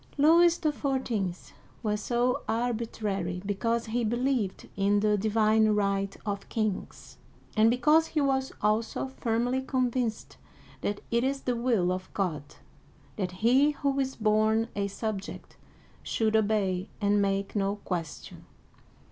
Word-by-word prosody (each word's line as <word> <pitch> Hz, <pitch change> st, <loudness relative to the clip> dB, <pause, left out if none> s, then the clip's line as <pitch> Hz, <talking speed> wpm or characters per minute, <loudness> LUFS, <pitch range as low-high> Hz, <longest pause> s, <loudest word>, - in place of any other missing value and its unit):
Louis 335 Hz, +4 st, +6 dB
XIV. 260 Hz, -, -1 dB, 0.4 s
was 210 Hz, -1 st, -1 dB
so 245 Hz, +2 st, 0 dB
arbitrary 215 Hz, -6 st, -2 dB
because 230 Hz, +3 st, -1 dB
he 235 Hz, +2 st, -1 dB
believed 240 Hz, -3 st, -1 dB
in 200 Hz, +1 st, +2 dB
"the 210 Hz, 0 st, +2 dB
divine 215 Hz, +1 st, +3 dB
right 200 Hz, -1 st, 0 dB
of 200 Hz, -1 st, -4 dB
kings," 215 Hz, -4 st, -3 dB, 0.4 s
and 220 Hz, +1 st, +5 dB
because 300 Hz, +7 st, +4 dB
he 310 Hz, -, -1 dB
was 270 Hz, -2 st, +1 dB
also 220 Hz, +5 st, 0 dB
firmly 245 Hz, 0 st, -1 dB
convinced 250 Hz, -3 st, -2 dB, 0.2 s
" -, -, -24 dB
that 205 Hz, 0 st, -2 dB
it 235 Hz, +1 st, +2 dB
is 270 Hz, +1 st, -1 dB
the 250 Hz, -, -1 dB
will 230 Hz, -7 st, +1 dB
of 185 Hz, 0 st, -4 dB
God 155 Hz, -7 st, -3 dB, 0.6 s
that 190 Hz, -3 st, -2 dB, 0.2 s
he 275 Hz, +5 st, +5 dB
who 275 Hz, -1 st, +1 dB
is 265 Hz, -1 st, -1 dB
born 220 Hz, +1 st, +2 dB
a 200 Hz, 0 st, 0 dB
subject 200 Hz, 0 st, -5 dB, 0.5 s
should 220 Hz, -1 st, 0 dB
obey 205 Hz, -3 st, +1 dB
and 205 Hz, -1 st, +2 dB
make 195 Hz, 0 st, -1 dB
no 200 Hz, 0 st, 0 dB
question." 175 Hz, -6 st, -6 dB
220 Hz, 130 wpm, -28 LUFS, 200-250 Hz, 0.6 s, Louis